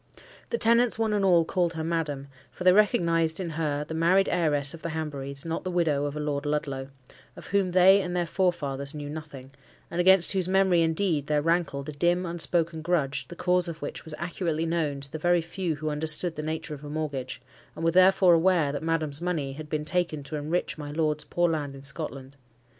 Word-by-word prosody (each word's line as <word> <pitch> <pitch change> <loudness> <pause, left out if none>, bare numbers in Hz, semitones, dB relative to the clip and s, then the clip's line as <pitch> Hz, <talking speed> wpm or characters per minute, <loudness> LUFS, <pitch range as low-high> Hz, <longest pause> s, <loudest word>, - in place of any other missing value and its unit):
The 470 - -1
tenants 235 - +3
one 220 -1 0
and 205 -1 +1
all 175 -3 +4
called 175 0 0
her 160 -1 -4
"Madam;" 155 -4 -2 0.2
for - - -8
they 185 - +7
recognized 165 -5 +2
in 175 -3 -4
her 150 -2 -2
the 160 - -7
married 175 +4 +3
heiress 145 -4 +1
of 165 - -10
the 170 - -4
Hanburys, 140 -3 -3
not 165 0 -3
the 185 - -3
widow 160 -5 +1
of 145 0 -4
a - - -4
Lord 145 -1 -2
Ludlow, 140 -3 -3 0.5
of - - -11
whom 200 -2 +1
they 185 +2 +6
and 180 -1 -4
their 175 -1 0
forefathers 150 -6 -1
knew 145 -1 -6
nothing; 150 -4 -9 0.4
and 175 - 0
against 190 0 +6
whose 185 -2 0
memory, 190 -2 +3
indeed, 160 -2 0
there 150 -1 +1
rankled 165 -4 0
a - - -4
dim 175 +5 +1
unspoken 170 -1 0
grudge, 155 -5 -1
the 175 - -10
cause 180 0 +1
of 165 -3 -7
which - - -6
was 160 -1 -7
accurately 170 -2 -2
known 155 -4 -1
to 140 -1 -9
the 155 - -5
very 175 +2 +3
few 170 0 -3
who 155 +1 -3
understood 160 +3 0
the 150 - -4
nature 155 0 -4
of 145 0 -9
a 145 - -7
mortgage, 145 -4 -4 0.4
and 165 - -4
were 165 - +3
therefore 185 0 +5
aware 165 -3 +3
that 145 - -4
Madam's 160 -2 -1
money 160 -6 -2
had 150 +1 -9
been 150 0 -2
taken 170 -3 0
to 140 +3 -7
enrich 155 +3 -2
my 145 -1 -6
lord's 150 -1 -1
poor 175 +4 +1
land 150 -4 -3
in 135 - -12
Scotland. 140 -1 -5
160 Hz, 215 wpm, -26 LUFS, 145-175 Hz, 0.5 s, they